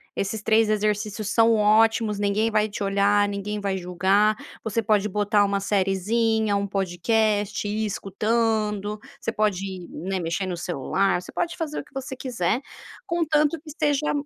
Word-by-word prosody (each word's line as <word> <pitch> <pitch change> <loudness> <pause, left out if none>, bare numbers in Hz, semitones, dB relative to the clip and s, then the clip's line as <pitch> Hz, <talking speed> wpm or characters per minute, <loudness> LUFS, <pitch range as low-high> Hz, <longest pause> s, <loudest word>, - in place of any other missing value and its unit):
Esses 210 +2 -2
3 220 0 +3
exercícios 210 0 -1
são 230 +1 +4
ótimos, 215 0 +3
ninguém 210 +2 +1
vai 215 0 +2
te 210 0 -5
olhar, 200 +1 +3
ninguém 205 +1 -4
vai 195 -1 -1
julgar. 190 +4 +2 0.3
Você 220 +1 0
pode 210 -1 +2
botar 205 +1 +2
uma 200 0 -1
seriezinha, 205 +2 +1
um 200 0 -2
podcast, 205 +3 0
ir 215 +1 -1
escutando. 210 0 -1 0.2
Você - - -2
pode, 190 -4 -2
né, 190 +2 -4
mexer 170 +3 -2
no 180 -2 -3
celular, 175 +3 0
você - - -11
pode 345 -1 -2
fazer 310 -2 -4
o - - -7
que - - -24
você 265 -1 -6
quiser, 240 -4 -1 0.5
contanto 315 -3 +1
que 315 - -13
seja 295 -1 +1
210 Hz, 155 wpm, -24 LUFS, 195-225 Hz, 0.5 s, são